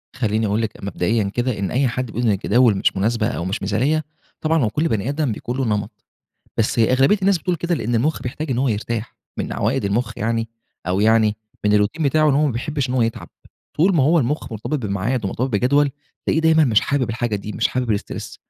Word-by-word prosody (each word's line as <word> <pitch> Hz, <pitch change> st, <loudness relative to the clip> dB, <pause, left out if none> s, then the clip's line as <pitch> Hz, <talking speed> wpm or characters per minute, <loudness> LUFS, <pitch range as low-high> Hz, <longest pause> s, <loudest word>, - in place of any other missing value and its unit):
خلّيني 110 Hz, -2 st, 0 dB
أقول 105 Hz, +2 st, 0 dB
لِك، 110 Hz, -2 st, -5 dB
مبدئيًا 100 Hz, +3 st, 0 dB
كده، 120 Hz, +2 st, -2 dB
إن 100 Hz, -, -2 dB
أي 130 Hz, +1 st, +2 dB
حد 125 Hz, +2 st, -2 dB
بيقول 115 Hz, 0 st, -4 dB
إن 115 Hz, -3 st, +3 dB
الجداول 110 Hz, +3 st, +3 dB
مش -, -, +1 dB
مناسبة 110 Hz, +2 st, +1 dB
أو 115 Hz, -8 st, -3 dB
مش 95 Hz, +4 st, -3 dB
مثاليّة، 130 Hz, +11 st, +1 dB, 0.4 s
طبعًا 160 Hz, -2 st, +2 dB
هوّ 110 Hz, -, +2 dB
كل 155 Hz, +9 st, 0 dB
بنِي 110 Hz, 0 st, -1 dB
آدم 145 Hz, -3 st, 0 dB
بيكون 120 Hz, +4 st, -4 dB
له 135 Hz, -, 0 dB
نمَط، 105 Hz, -2 st, -3 dB, 0.5 s
بس 115 Hz, +1 st, 0 dB
أغلبية 130 Hz, -, +4 dB
الناس 195 Hz, -1 st, +3 dB
بتقول 180 Hz, +1 st, -1 dB
كده 170 Hz, +2 st, -1 dB
لأن 120 Hz, -3 st, -2 dB
المخ 140 Hz, +8 st, 0 dB
بيحتاج 145 Hz, +4 st, -4 dB
إن 125 Hz, -, 0 dB
هوّ 135 Hz, +1 st, +2 dB
يرتاح، 115 Hz, +1 st, -3 dB, 0.2 s
من -, -, -3 dB
عوائد -, -, 0 dB
المخ 105 Hz, +5 st, 0 dB
يعني، 115 Hz, +1 st, -1 dB, 0.4 s
أو 95 Hz, +2 st, 0 dB
يعني 110 Hz, -1 st, +3 dB, 0.3 s
من 105 Hz, -, +3 dB
الروتين 105 Hz, +11 st, +1 dB
بتاعُه، 155 Hz, +2 st, +3 dB
إن 135 Hz, -, +2 dB
هو 150 Hz, +2 st, +3 dB
ما 140 Hz, -, 0 dB
بيحِبّش 140 Hz, +3 st, -2 dB
إن 125 Hz, -, -2 dB
هو 125 Hz, -, +3 dB
يتعَب، 115 Hz, 0 st, -3 dB, 0.5 s
طول 180 Hz, +5 st, +3 dB
ما 145 Hz, -, +4 dB
هو 160 Hz, +5 st, +4 dB
المخ 145 Hz, -1 st, -1 dB
مرتبِط 110 Hz, +8 st, -3 dB
بميعاد، 100 Hz, +4 st, -1 dB
ومرتبِط 125 Hz, +7 st, -1 dB
بجدوَل، 140 Hz, +6 st, +2 dB, 0.4 s
تلاقيه 160 Hz, -, +2 dB
دايمًا 160 Hz, -1 st, +4 dB
مش 110 Hz, -6 st, +4 dB
حابب 135 Hz, -4 st, 0 dB
الحاجة 110 Hz, -1 st, -1 dB
دي، 105 Hz, +2 st, -6 dB
مش -, -, +1 dB
حابب 125 Hz, -4 st, 0 dB
الstress -, -, -7 dB
120 Hz, 220 wpm, -21 LUFS, 105-140 Hz, 0.5 s, أغلبية